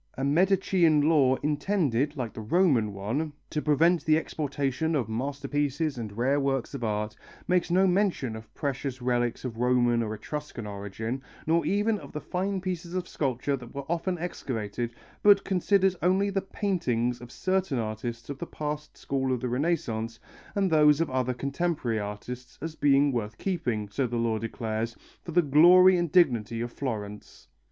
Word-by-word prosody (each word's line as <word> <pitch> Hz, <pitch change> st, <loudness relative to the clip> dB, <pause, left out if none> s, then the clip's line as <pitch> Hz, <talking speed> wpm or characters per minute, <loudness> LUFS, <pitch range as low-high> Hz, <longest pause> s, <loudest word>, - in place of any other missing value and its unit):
A 135 Hz, -, -2 dB
Medicean 170 Hz, -1 st, +3 dB
law 140 Hz, -5 st, +4 dB
intended, 150 Hz, -, 0 dB
like 120 Hz, -4 st, -3 dB
the -, -, -7 dB
Roman 125 Hz, -, +2 dB
one, 115 Hz, +11 st, -3 dB, 0.2 s
to 150 Hz, -, -1 dB
prevent 165 Hz, +4 st, +3 dB
the 155 Hz, 0 st, +4 dB
exportation 145 Hz, 0 st, -1 dB
of 130 Hz, -7 st, 0 dB
masterpieces 140 Hz, +4 st, -2 dB
and 105 Hz, -2 st, -6 dB
rare 135 Hz, +4 st, +2 dB
works 135 Hz, -2 st, -1 dB
of 135 Hz, -4 st, -5 dB
art, 105 Hz, -1 st, -2 dB, 0.3 s
makes 180 Hz, -1 st, +2 dB
no 185 Hz, +3 st, +4 dB
mention 180 Hz, -, +1 dB
of 110 Hz, 0 st, -10 dB
precious 135 Hz, -2 st, -3 dB
relics 120 Hz, 0 st, -1 dB
of 115 Hz, -3 st, -5 dB
Roman 120 Hz, -1 st, +3 dB
or 110 Hz, -1 st, -2 dB
Etruscan 145 Hz, +1 st, -6 dB
origin, 105 Hz, +5 st, -5 dB, 0.2 s
nor 165 Hz, +2 st, +2 dB
even 205 Hz, +1 st, +1 dB
of -, -, -12 dB
the 150 Hz, -, -3 dB
fine 190 Hz, +3 st, -2 dB
pieces 180 Hz, -1 st, -4 dB
of 180 Hz, -1 st, -2 dB
sculpture 135 Hz, 0 st, -1 dB
that 125 Hz, 0 st, -11 dB
were 140 Hz, -1 st, -4 dB
often 170 Hz, +2 st, -1 dB
excavated, 120 Hz, -, -3 dB, 0.3 s
but 205 Hz, -1 st, +6 dB
considers 190 Hz, 0 st, +2 dB
only 190 Hz, +3 st, +2 dB
the 195 Hz, 0 st, 0 dB
paintings 125 Hz, -, -1 dB
of 120 Hz, 0 st, -10 dB
certain 185 Hz, -6 st, 0 dB
artists 115 Hz, +1 st, -4 dB
of 140 Hz, -1 st, -6 dB
the 170 Hz, -, -5 dB
past 150 Hz, 0 st, -5 dB
school 135 Hz, -1 st, -1 dB
of 125 Hz, -, 0 dB
the 125 Hz, -, -3 dB
Renaissance 120 Hz, -6 st, -1 dB, 0.4 s
and 195 Hz, -3 st, +1 dB
those 150 Hz, -1 st, +5 dB
of 165 Hz, -4 st, 0 dB
other 130 Hz, -1 st, 0 dB
contemporary 140 Hz, -3 st, -1 dB
artists, 120 Hz, +5 st, -7 dB
as 160 Hz, +1 st, -5 dB
being 145 Hz, -1 st, +3 dB
worth 110 Hz, -4 st, -3 dB
keeping, 120 Hz, -, -2 dB
so 125 Hz, +6 st, -1 dB
the 120 Hz, 0 st, -3 dB
law 115 Hz, -1 st, 0 dB
declares, 115 Hz, 0 st, -3 dB, 0.3 s
for 170 Hz, -, -7 dB
the 175 Hz, +1 st, +4 dB
glory 175 Hz, +6 st, +7 dB
and 175 Hz, -3 st, 0 dB
dignity 120 Hz, -, +3 dB
of 120 Hz, +1 st, -3 dB
Florence. 105 Hz, -6 st, -6 dB
140 Hz, 170 wpm, -27 LUFS, 120-170 Hz, 0.4 s, glory